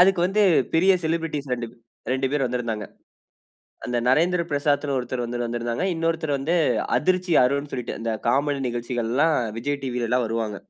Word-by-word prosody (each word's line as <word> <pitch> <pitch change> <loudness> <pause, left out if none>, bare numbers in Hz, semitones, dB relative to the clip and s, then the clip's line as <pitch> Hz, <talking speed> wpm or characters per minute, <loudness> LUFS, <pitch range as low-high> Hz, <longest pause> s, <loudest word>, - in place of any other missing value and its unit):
அதுக்கு 185 -1 +5
வந்து 210 +3 +2 0.3
பெரிய 190 +4 +5
செலிபிரிட்டிஸ் 160 -3 -2
2 120 -2 -2
ப் - - -20 0.4
2 130 0 0
பேர் 145 -2 +1
வந்திருந்தாங்க. 115 -4 -3 1.0
அந்த 125 - -2
"நரேந்திர 170 +6 +3
பிரசாத்ன்னு" 145 -1 +1
ஒருத்தர் 125 0 -3
வந்து 120 +1 -4
வந்திருந்தாங்க. 120 +6 -2
இன்னொருத்தர் 160 -3 0
வந்து 155 +6 0 0.4
"அதிர்ச்சி 185 +2 +1
அருண்னு" 140 +3 0
சொல்லிட்டு 125 -4 -4
இந்த 115 0 -2
காமெடி 140 +3 +1
நிகழ்ச்சிகள்லாம் 120 +5 0 0.2
விஜய் 140 +3 -2
டிவிலலாம் 125 -1 0
வருவாங்க. 110 -2 -2
135 Hz, 145 wpm, -24 LUFS, 120-160 Hz, 1.0 s, அதுக்கு